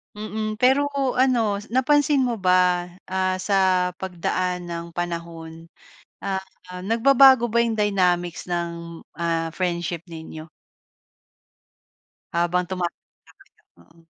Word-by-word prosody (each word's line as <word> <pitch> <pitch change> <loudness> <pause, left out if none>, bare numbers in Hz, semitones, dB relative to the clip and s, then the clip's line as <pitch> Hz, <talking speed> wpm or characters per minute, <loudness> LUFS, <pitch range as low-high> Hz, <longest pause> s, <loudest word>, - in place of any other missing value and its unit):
Mm. 215 +1 -4
Pero 270 +4 +3 0.2
ano, 245 -5 +2 0.2
napansin 290 +3 +3
mo 245 -2 0
ba, 180 -2 +2 0.2
ah, 185 0 -1
sa 195 +2 0 0.4
pagdaan 180 -1 -3
ng 170 -1 -5
panahon, 165 -1 -6 0.5
ah, 195 -1 -3 0.4
nagbabago 250 +4 +5
ba 235 0 +2
yung 230 -2 -1
dynamics 180 -4 0
ng, 170 -1 -4
ah, 165 -1 -2
friendship 175 -2 -2
ninyo? 160 -1 -9 1.8
Habang 175 +1 +1
tumatanda 180 -1 -6
kayo? - - -26 0.2
Oo. 165 - -24
180 Hz, 100 wpm, -23 LUFS, 170-220 Hz, 1.8 s, nagbabago